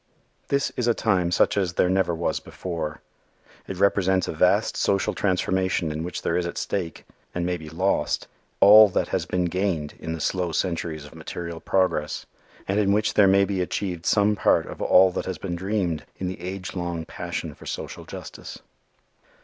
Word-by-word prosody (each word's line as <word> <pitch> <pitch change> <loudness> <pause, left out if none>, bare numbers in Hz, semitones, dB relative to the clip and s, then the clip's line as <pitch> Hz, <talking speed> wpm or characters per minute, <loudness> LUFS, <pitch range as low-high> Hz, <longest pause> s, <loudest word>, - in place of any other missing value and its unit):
This 140 -1 0
is 120 - -2
a 120 - +3
time 90 -2 +1
such 90 - +2
as 95 -3 0
there 90 - +2
never 90 -2 +1
was 80 -2 -1
before. 85 -4 -5 0.7
It 95 - -5
represents 95 -1 +2
a - - -2
vast - - +2
social 100 +1 +1
transformation 95 -3 0
in 75 +1 -4
which 90 - -5
there 85 - 0
is 90 -1 0
at 85 - -6
stake, 90 -5 -3 0.3
and 90 -1 -1
may 90 0 0
be 80 -2 -8
lost, 90 +5 0 0.3
all 105 +1 +9
that - - -1
has - - -1
been 90 -1 0
gained 85 -4 -1
in 80 - -4
the 80 - -5
slow 90 +2 -1
centuries 80 -3 -2
of 75 - -13
material 85 +1 -6
progress 90 -6 0 0.4
and 100 +2 +1
in 100 -2 +2
which 105 +1 +1
there 105 -2 +6
may 100 +1 +5
be 95 -2 -1
achieved 90 -1 -3
some 105 0 +3
part - - +3
of - - -9
all 95 0 +6
that - - -4
has 95 -3 -3
been 85 +2 -4
dreamed 90 -3 -1
in 95 - -4
the 90 -1 -6
age 95 +1 -5
long 85 -2 -3
passion - - -5
for - - -13
social - - -5
justice. - - -9
90 Hz, 190 wpm, -24 LUFS, 85-95 Hz, 0.7 s, all